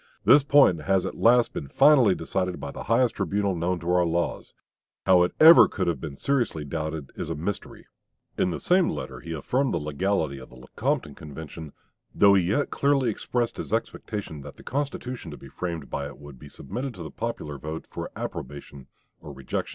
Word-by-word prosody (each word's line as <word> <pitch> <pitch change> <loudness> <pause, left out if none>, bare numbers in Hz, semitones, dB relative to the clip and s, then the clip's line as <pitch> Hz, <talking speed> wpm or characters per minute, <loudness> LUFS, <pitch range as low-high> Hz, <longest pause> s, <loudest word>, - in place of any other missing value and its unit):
This 145 - +7
point 140 - +5
has 95 +3 +1
at - - -3
last 120 +1 +4
been 70 - -5
finally 135 - +5
decided 90 -2 -2
by 70 - -6
the - - -8
highest 115 +1 +2
tribunal 100 +1 0
known 90 +1 -1
to 85 +1 -1
our 90 0 +4
laws. 85 0 -2 0.5
How 90 -1 +6
it 90 - 0
could - - +5
ever 165 +1 +10 0.2
have 85 -1 -1
been 75 -4 -6
seriously 120 - -1
doubted 80 -1 -4
is - - -5
a - - -2
mystery." 90 +7 -5 0.5
In 90 - +1
the - - -3
same 180 0 +3
letter - - -5
he 85 - -9
affirmed 125 - 0
the - - +1
legality 75 -1 -1
of 65 - -12
the - - -15
Lecompton 95 - -3
Convention, 80 +1 -9 0.4
though 100 -1 +6
he 95 - +5
yet 110 +11 0
clearly 140 -4 +2
expressed 120 +2 -2
his - - -6
expectation 105 -7 -4
that - - -11
the - - -14
constitution 130 - -4
to 75 - -8
be 70 - -13
framed 85 +2 -5
by 70 0 -3
it 70 - -11
would 70 -3 -12
be 70 - -12
submitted 120 - -6
to 90 - -8
the 80 - -8
popular 75 -11 -5
vote 80 +3 -6
for - - -6
"approbation 70 0 -7 0.3
or - - -10
rejection." 65 -2 -4
90 Hz, 195 wpm, -26 LUFS, 75-115 Hz, 0.5 s, ever